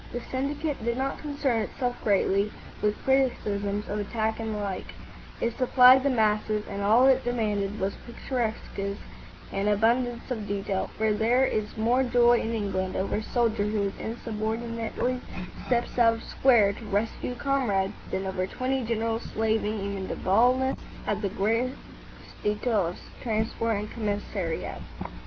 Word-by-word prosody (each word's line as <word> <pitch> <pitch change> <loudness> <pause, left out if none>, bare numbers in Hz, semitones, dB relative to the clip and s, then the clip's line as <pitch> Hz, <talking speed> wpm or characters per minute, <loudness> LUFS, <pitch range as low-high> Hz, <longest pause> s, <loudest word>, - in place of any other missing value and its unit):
The 245 - -2
syndicate 280 +1 -2
did 235 +1 0
not 270 +1 -2
concern 285 -6 0
itself 245 +3 -2
greatly 200 0 +2 0.3
with 210 0 +1
criticisms 210 -6 +1
of 210 - -2
attack 220 +2 -1
and 220 -1 -3
the - - -2
like. 200 -2 -4 0.4
It 235 0 -1
supplied 255 0 +7
the 280 - +2
masses, 215 -3 +1
and 200 0 -4
all 220 +6 +5
it 265 -1 +5
demanded 210 -4 -1
was 195 +1 0
picturesqueness 220 -5 -3 0.5
and 195 +1 0
abundance 235 +4 +1
of 220 -4 -3
detail; 195 -1 -2
for 220 0 +2
there 235 +5 +3
is 215 -3 -2
more 235 +4 +3
joy 240 -1 +4
in 225 - -2
England 195 -4 -2
over 190 +2 0
a - - -1
soldier 230 -3 +1
who 205 -2 0
insubordinately 230 +2 -3 0.5
steps 245 0 0
out 230 -1 +6
of 225 - -9
square 225 -7 +4
to 225 +2 -10
rescue 210 +4 -1
a - - -9
comrade 240 -8 +1 0.2
than 190 - -2
over 185 -1 -1
twenty 260 +4 -1
generals 225 0 -1
slaving 220 -1 0
even 195 -1 -3
to - - -3
baldness 250 +7 +3 0.3
at 210 0 -1
the 200 - 0
gross 230 +6 0 0.7
details 210 -4 0
of - - -16
transport 225 -1 0
and 210 +1 -5
commissariat. 205 -5 -3
220 Hz, 150 wpm, -27 LUFS, 205-245 Hz, 0.7 s, supplied